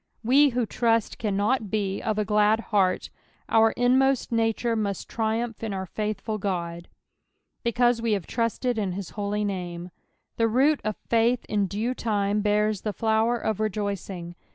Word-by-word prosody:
We, 280 Hz, +5 st, +5 dB
who 245 Hz, -2 st, 0 dB
trust, 230 Hz, 0 st, 0 dB
cannot 210 Hz, +4 st, +1 dB
but 210 Hz, -, -9 dB
be 200 Hz, -2 st, -1 dB
of 215 Hz, -1 st, -1 dB
a 210 Hz, -, +1 dB
glad 210 Hz, +2 st, +3 dB
heart, 185 Hz, -3 st, +2 dB, 0.4 s
our 225 Hz, 0 st, +5 dB
inmost 260 Hz, +2 st, +2 dB
nature 230 Hz, 0 st, +1 dB
must 200 Hz, -3 st, -2 dB
triumph 225 Hz, +1 st, -2 dB
in 215 Hz, -3 st, -2 dB
our 190 Hz, 0 st, -3 dB
fnitliful 215 Hz, +2 st, -3 dB
God. 170 Hz, -3 st, -3 dB, 0.4 s
" -, -, -51 dB
Beeaute 240 Hz, 0 st, +2 dB
ite 230 Hz, -, -5 dB
hate 195 Hz, -5 st, -2 dB
trusted 235 Hz, +1 st, -1 dB
in 195 Hz, -4 st, -1 dB
hit 195 Hz, -1 st, -5 dB
holy 210 Hz, 0 st, -2 dB
saiM." 180 Hz, -3 st, -4 dB, 0.5 s
The 230 Hz, -, +3 dB
root 275 Hz, +6 st, +3 dB
of 215 Hz, 0 st, -2 dB
faith 235 Hz, +1 st, +2 dB
in 205 Hz, -2 st, 0 dB
due 215 Hz, +7 st, -2 dB
lime 205 Hz, -2 st, +1 dB
bean 210 Hz, +1 st, +2 dB
the 210 Hz, -, -3 dB
flower 225 Hz, +2 st, +2 dB
of 220 Hz, -3 st, -2 dB
rejoicing. 200 Hz, -4 st, -3 dB
215 Hz, 165 wpm, -26 LUFS, 200-230 Hz, 0.5 s, We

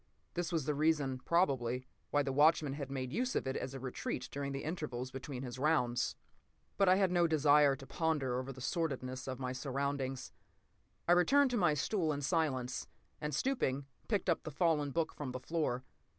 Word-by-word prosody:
This 175 Hz, +1 st, -2 dB
was 160 Hz, -5 st, 0 dB
the 150 Hz, -, +1 dB
reason, 145 Hz, -3 st, +1 dB
probably, 130 Hz, -6 st, +1 dB, 0.2 s
why 145 Hz, 0 st, +2 dB
the 135 Hz, -, -1 dB
watchman 150 Hz, 0 st, +4 dB
had 140 Hz, -2 st, -5 dB
made 130 Hz, -2 st, -4 dB
use 250 Hz, +1 st, 0 dB
of -, -, 0 dB
it 130 Hz, -, -2 dB
as 130 Hz, +1 st, -4 dB
a -, -, -5 dB
retreat 130 Hz, -1 st, -4 dB
during 140 Hz, 0 st, -3 dB
the 135 Hz, -, -4 dB
intervals 145 Hz, -6 st, -4 dB
between 135 Hz, 0 st, -6 dB
his 125 Hz, 0 st, -6 dB
rounds. 125 Hz, -5 st, +1 dB, 0.6 s
But 195 Hz, -2 st, +4 dB
I 185 Hz, -, +7 dB
had 190 Hz, -2 st, +3 dB
no 175 Hz, -1 st, +4 dB
desire 145 Hz, -2 st, +5 dB
to 135 Hz, 0 st, -11 dB
ponder 145 Hz, -6 st, 0 dB
over 130 Hz, +1 st, -5 dB
the 130 Hz, -1 st, -10 dB
sordidness 130 Hz, -3 st, -2 dB
of 130 Hz, -1 st, -3 dB
my 130 Hz, -1 st, -3 dB
surroundings. 135 Hz, 0 st, -2 dB, 0.8 s
I -, -, +4 dB
returned 260 Hz, +10 st, +5 dB
to 245 Hz, -, +1 dB
my 175 Hz, -7 st, +3 dB
stool 160 Hz, +2 st, 0 dB
in 145 Hz, 0 st, -4 dB
silence, 135 Hz, -6 st, 0 dB, 0.3 s
and 150 Hz, 0 st, -2 dB
stooping, 140 Hz, -, 0 dB, 0.2 s
picked 205 Hz, -5 st, 0 dB
up 170 Hz, -, +2 dB
the -, -, -6 dB
fallen 155 Hz, -2 st, +1 dB
book 160 Hz, +3 st, -1 dB
from 135 Hz, -4 st, -5 dB
the 130 Hz, -, -4 dB
floor. 130 Hz, -3 st, -1 dB
145 Hz, 195 wpm, -34 LUFS, 130-165 Hz, 0.8 s, I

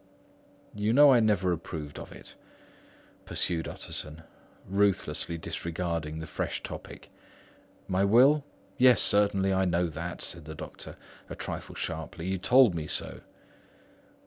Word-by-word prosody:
"You 105 Hz, +2 st, 0 dB
know 145 Hz, +1 st, +8 dB
I 120 Hz, -, +5 dB
never 100 Hz, -5 st, +2 dB
approved 80 Hz, -3 st, -6 dB
of -, -, -10 dB
it," -, -, -12 dB, 0.9 s
pursued 80 Hz, -2 st, -2 dB
Utterson, 75 Hz, +2 st, -7 dB, 0.4 s
ruthlessly 95 Hz, -4 st, 0 dB
disregarding 85 Hz, -1 st, -4 dB
the 80 Hz, -, -5 dB
fresh 80 Hz, -, -4 dB
topic. -, -, -9 dB, 0.8 s
"My 95 Hz, +1 st, +1 dB
will? 130 Hz, +8 st, +5 dB, 0.4 s
Yes, 125 Hz, -3 st, +6 dB
certainly, 100 Hz, -1 st, +3 dB
I 95 Hz, 0 st, +2 dB
know 90 Hz, 0 st, +1 dB
that," 85 Hz, +3 st, -5 dB
said 85 Hz, -3 st, -3 dB
the 80 Hz, 0 st, -8 dB
doctor, -, -, -9 dB, 0.3 s
a -, -, -6 dB
trifle -, -, -6 dB
sharply. 80 Hz, +1 st, -5 dB
"You 95 Hz, -, -2 dB
have 95 Hz, -2 st, -3 dB
told 125 Hz, -3 st, +5 dB
me 80 Hz, -2 st, -4 dB
so." -, -, -2 dB
90 Hz, 135 wpm, -28 LUFS, 80-105 Hz, 0.9 s, know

